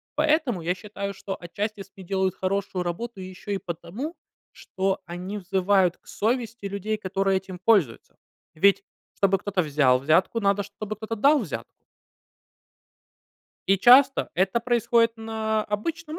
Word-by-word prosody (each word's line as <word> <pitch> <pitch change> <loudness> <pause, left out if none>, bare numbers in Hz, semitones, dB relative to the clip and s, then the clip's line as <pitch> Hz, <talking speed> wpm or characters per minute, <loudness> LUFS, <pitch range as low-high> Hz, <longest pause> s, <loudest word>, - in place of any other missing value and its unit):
Поэтому 300 - +1
я 175 +2 -1
считаю, 200 0 -6
что 195 0 -6
отчасти, 205 +5 -4
если 195 0 -11
делают 190 0 0
хорошую 190 -1 -2
работу 200 +6 -5
ещё 185 +2 -8
и 200 - +1
потому, 185 - -6 0.4
что 190 0 -2
они 180 +4 -6
взывают 190 -1 +2
к - - -31
совести 230 -1 -2
людей, 200 +2 -2
которые 195 -1 0
этим 190 -1 -8
пользуются. 185 - +1 0.4
Ведь, 195 +5 +4 0.3
чтобы 195 -1 +3
кто-то 195 -1 -1
взял 140 -4 +3
взятку, 165 - +2
надо, 200 -1 +2
чтобы 205 +1 -7
кто-то 220 +1 -5
дал 285 +7 +4
взятку. 190 - -7 1.8
И 195 +1 +3
часто 265 +6 +6
это 190 +6 +1
происходит 235 -1 +2
на 220 -1 -2
обычном 315 +10 -4
200 Hz, 135 wpm, -25 LUFS, 185-225 Hz, 1.8 s, часто